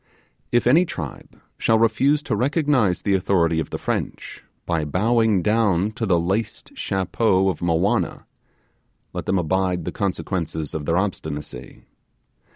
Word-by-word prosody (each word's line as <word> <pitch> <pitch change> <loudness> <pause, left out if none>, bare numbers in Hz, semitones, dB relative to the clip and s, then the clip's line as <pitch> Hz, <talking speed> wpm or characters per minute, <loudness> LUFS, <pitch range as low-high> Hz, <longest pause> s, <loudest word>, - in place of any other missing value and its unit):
If 120 -1 +2
any 150 +9 +6
tribe 85 - -7 0.2
shall 110 - +3
refuse 140 +6 +2
to 115 - -1
recognize 130 - +1
the 100 - +1
authority 85 -4 +2
of 80 - -3
the - - -4
French, - - -4 0.2
by 85 -3 0
bowing 105 +4 +2
down 105 -3 +2
to 110 0 -3
the 90 -3 +3
laced 95 +6 -3
chapeau 95 0 +1
of 90 - -3
Mowanna, 90 +4 0 0.9
let - - -5
them 95 - +2
abide 90 0 0
the - - -2
consequences 85 -6 -3
of 75 -2 -4
their 85 +1 +2
obstinacy. 75 -9 -4
95 Hz, 140 wpm, -22 LUFS, 85-115 Hz, 0.9 s, any